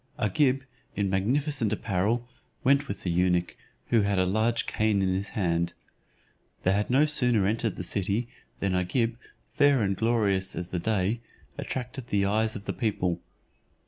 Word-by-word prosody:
Agib, 130 +6 +2 0.3
in 100 -2 0
magnificent 120 +4 +1
apparel, 110 +3 0 0.4
went 140 +2 +3
with 100 - -5
the 90 - 0
eunuch, 90 0 +1 0.3
who 115 -2 +4
had 100 -1 +1
a 95 - +3
large 110 +4 +1
cane 110 -2 +1
in 95 -1 +1
his 95 +2 -2
hand. 85 -3 +1 0.9
They 95 - +3
had 105 +1 0
no 135 +4 +5
sooner 125 -9 +2
entered 110 +1 0
the - - -5
city, 100 +5 -1 0.3
than 100 -1 +1
Agib, 115 +6 +1 0.4
fair 140 -5 +4
and 100 -1 +1
glorious 100 -3 +1
as 90 0 -4
the 90 - -2
day, 105 +3 0 0.3
attracted 125 0 -5
the 100 -3 +1
eyes 110 +2 +1
of 105 - -7
the - - -2
people. 90 -7 -1
105 Hz, 160 wpm, -27 LUFS, 95-120 Hz, 0.9 s, no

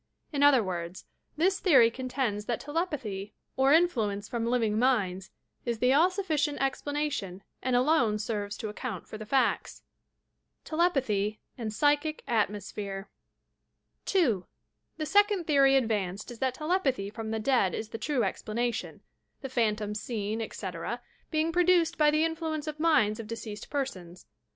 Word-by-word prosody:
In 285 - 0
other 285 -5 +6
words, 175 -1 -5 0.3
this 375 +5 +2
theory 260 - +6
contends 250 -4 -2
that 235 0 -1
telepathy 270 - -3 0.2
op 265 +1 +4
influence 225 -12 +2
from 235 -2 -2
living 225 -3 +1
minds 200 -7 +1 0.3
is 235 -2 -2
the 250 +3 +3
all 325 +6 +5
sufBcient 315 -7 -1
explana 290 +2 -1
tion 190 -5 -5 0.2
and 255 -1 0
alone 245 -5 +3
serves 205 -1 -3
to 215 - -4
account 210 -3 -6
for 215 - -8
the 215 - -8
facta. 265 +3 +1 0.8
TBLEPATHT 260 - +1 0.2
AND 230 -4 -4
"pSTCniC 290 +6 +1
ATMOSPHEBE" 205 -3 -2 1.0
2. 245 - +2 0.5
The 310 - -2
second 405 +1 +3
theory 275 -3 +5
advanced 210 -4 -1
is 235 - -10
that 260 -1 0
telepathy 285 - 0
from 220 0 -6
the 220 - -1
dead 220 -4 +2
is 220 - -5
the 225 - -6
true 255 +1 0
explanation 235 +2 -2 0.2
— - - -48
the 270 - -4
phantoms 210 -4 0
fieen, 220 -1 -3
etc., 195 +1 -5 0.3
being 315 +1 +1
produced 350 -1 +3
by 300 -1 +6
the 305 +2 +3
influence 320 -2 -3
of 305 -1 -5
minds 265 -11 +3
of 225 - -6
de 230 - -4
ceased 215 -2 -8
persons. 185 -11 -4
245 Hz, 150 wpm, -29 LUFS, 210-300 Hz, 1.0 s, other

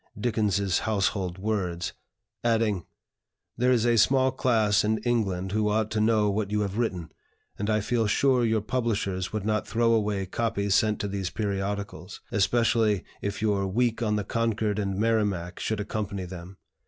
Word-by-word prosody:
Dickens's 100 -5 +1
Household 100 -4 -1
Words," 95 -4 -2 0.5
adding: 110 -5 +1 0.7
"There 125 +2 +2
is 120 -2 +3
a 120 -1 +4
small 130 +4 +4
class 110 -6 +2
in 110 +1 +1
England 100 -6 0
who 105 0 +1
ought 110 +1 0
to 110 - 0
know 110 -1 +3
what 100 0 -1
you 105 0 0
have 100 +2 -2
written, 90 -9 -2 0.5
and 105 +2 -1
I 105 0 +2
feel 115 +1 0
sure 130 +4 +3
your 110 -2 +2
publishers 105 -5 -1
would 110 -2 -3
not 110 0 0
throw 115 0 +2
away 105 -3 0
copies 100 0 -1
sent 105 0 +2
to 100 - -2
these 100 -2 -3
periodicals; 100 -2 -4
especially 110 -1 +2 0.2
if 100 +1 -3
your 100 -2 +1
'Week 115 +3 0
on 105 -2 +1
the 105 - -1
Concord 110 -1 -1
and 100 -2 -2
Merrimac' 105 -5 0
could 110 -1 -1
accompany 100 -2 -3
them. 90 +1 -9
105 Hz, 165 wpm, -27 LUFS, 100-115 Hz, 0.7 s, a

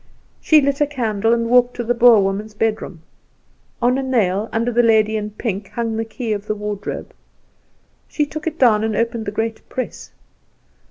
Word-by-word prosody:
She 310 -1 +5
lit 280 +1 0
a 295 - +4
candle, 225 -6 -1
and 230 0 +1
walked 245 +1 +3
to 240 - -3
the 240 +1 +1
Boer 235 -3 +6
woman's 205 +2 -3
bedroom. 210 -6 -2 0.8
On 250 +2 +3
a - - -1
nail 220 -6 0
under 230 +2 0
the 240 +1 +3
lady 220 -2 +3
in 210 -1 -3
pink 210 -2 -4
hung 230 -2 -3
the 225 0 -2
key 225 0 -4
of 205 0 -5
the 215 - -1
wardrobe. 210 -1 -5 0.9
She 300 - -1
took 310 +2 -7
it 325 0 -3
down 220 -6 +4
and 220 -1 -1
opened 230 0 -1
the - - -1
great 220 +1 -3
press. 255 - -5
225 Hz, 185 wpm, -20 LUFS, 210-245 Hz, 0.9 s, Boer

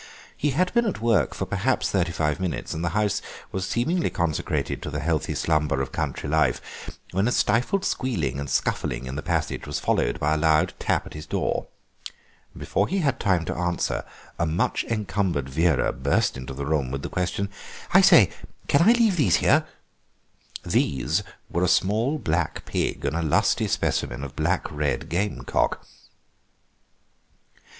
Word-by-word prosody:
He 150 - 0
had 180 +7 +1
been 235 -1 +3
at 195 - -2
work 115 -1 +2
for - - -2
perhaps - - 0
thirty 90 -3 +1
five 75 -1 -1
minutes, 95 -3 -3
and 80 - -4
the 85 - +1
house 105 -2 +1 0.3
was 95 -1 -2
seemingly 165 +9 0
consecrated 85 -5 -1
to - - -5
the 75 - -3
healthy 80 +1 -1
slumber 75 -4 +1
of 65 - -3
country - - -3
life, 80 +2 -1
when 95 +4 +1
a - - +1
stifled 125 - +1
squealing 80 - -1
and 70 -1 -4
scuffling 65 -1 -1
in 65 +1 -5
the 75 - -3
passage 80 -2 -2
was 75 - -2
followed - - 0
by 75 +1 +1
a - - +1
loud 80 0 +3
tap - - 0
at - - -10
his 75 +1 -8
door. - - -1 0.9
Before 100 - 0
he 195 - -1
had 140 -5 0
time 90 -5 +1
to - - -2
answer, 90 0 -1 0.4
a 85 - +1
much 80 +6 0
encumbered 100 - -1
Vera 75 0 +2
burst 70 +2 +1
into 65 0 -7
the 70 +1 -4
room 75 -3 0
with 70 +1 -4
the - - -2
question; 90 +2 -2 0.4
"I - - +8
say, - - +7 0.4
can 140 - +4
I 215 +7 +7
leave 225 -6 +3
these 145 - +4
here?" - - +3 1.0
"These" 70 +8 +1 0.3
were 85 - -1
a - - +3
small 110 - +2
black 85 - -1
pig - - -2
and 75 - -1
a 85 - 0
lusty 80 -3 +2
specimen - - -1
of 70 - -7
black - - 0
red 75 -4 -2
gamecock. 85 -8 -1
85 Hz, 170 wpm, -25 LUFS, 75-105 Hz, 1.0 s, I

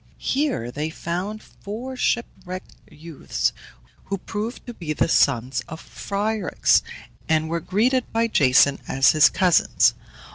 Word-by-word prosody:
Here 265 - -1
they 150 +4 -3
found 180 +7 -4
four 240 +6 -8
shipwrecked 185 -7 -3 0.2
youths, 160 0 -3 0.5
who 195 - -3
proved 215 +5 -5
to 240 - -7
be 165 -8 -4
the - - +1
sons 130 -5 +2
of 160 - -8
Phryxus, 205 -1 0 0.5
and 160 0 +2
were 170 +1 -1
greeted 235 +9 0
by 230 +1 +1
Jason 140 - +4
as 135 +1 +4
his 155 -1 +6
cousins. 180 -2 +3
180 Hz, 130 wpm, -23 LUFS, 155-220 Hz, 0.5 s, his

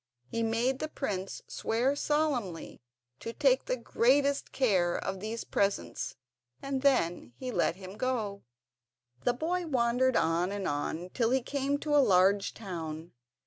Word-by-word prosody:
He 230 - -1
made 230 +4 +1
the 310 - -2
prince 195 -11 -4
swear 245 +5 0
solemnly 285 - -1 0.4
to 230 - -6
take 270 -1 +3
the 255 - -1
greatest 275 +4 +2
care 190 -10 +2
of 195 0 -3
these 220 +3 -4
presents, 200 0 -1 0.4
and 275 -1 -3
then 175 - +1
he 255 - -4
let 195 - +1
him 190 +1 -10
go. 220 -6 -1 0.8
The 245 - +4
boy 340 +6 -1
wandered 250 -1 +2
on 165 +3 +1
and 200 -2 -3
on 160 +5 -3
till 230 -3 +2
he 260 0 +2
came 280 +2 -1
to 295 -1 +1
a - - +7
large 195 -2 +3
town. 165 -5 -6
230 Hz, 145 wpm, -30 LUFS, 190-265 Hz, 0.8 s, a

